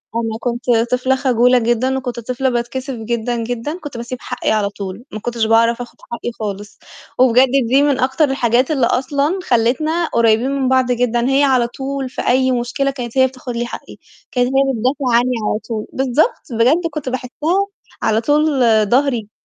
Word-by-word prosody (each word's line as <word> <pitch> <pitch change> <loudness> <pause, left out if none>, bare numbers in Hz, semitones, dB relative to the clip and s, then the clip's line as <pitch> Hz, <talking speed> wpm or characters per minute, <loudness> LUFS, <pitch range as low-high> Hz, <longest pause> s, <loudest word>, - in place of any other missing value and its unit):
أنا 225 -1 -2
كنت 240 0 -3 0.3
طفلة 255 +1 +2
خجولة 250 -1 +3
جدًا 240 +3 0
وكنت 245 -2 -4
طفلة 250 +3 -1
باتكسف 255 +3 -3
جدًا، 235 +1 -3
جدًا، 245 +9 -4
كنت 285 -7 -8
بسيب 235 +2 -5
حقّي - - -2
على 210 -2 +1
طول 200 +2 -7
ما 215 - -5
كنتش 235 0 -2
باعرف 230 +2 +3
آخُد 240 - -10
حقّي 235 0 -4
خالص. 205 -1 -6 0.4
وبجد 255 +1 +5 0.2
دي 270 +4 +4
من 285 -3 +1
أكتر 265 +4 +2
الحاجات 250 +1 +1
اللي 265 -5 +2
أصلًا 280 +9 0
خلّتنا 310 +9 +1
قريّبين 235 +3 +3
من 270 -2 0
بعض 260 -1 +2
جدًا، 240 +1 +1
هي 275 +1 +3
على 255 -4 +3
طول 270 +1 -4
في - - -5
أي 260 +1 +3
مشكلة 255 +3 -1
كانت 245 -1 -6
هي 260 0 +5
بتاخد 255 -2 -8
لي 240 +1 -1
حقّي، - - -9 0.3
كانت 245 -1 +1
هي 270 0 +2
بتدافع 255 +2 0
عني 250 +1 +1 0.2
على 210 - -1
طول، 220 -2 -3
بالضبط، 265 - +1
بجد 270 +10 +2
كنت 290 -4 -4
باحسّها 305 +10 -1 0.4
على 220 +1 +2
طول 295 +1 +2 0.3
ضهري. 245 -5 +1
250 Hz, 175 wpm, -18 LUFS, 235-270 Hz, 0.4 s, وبجد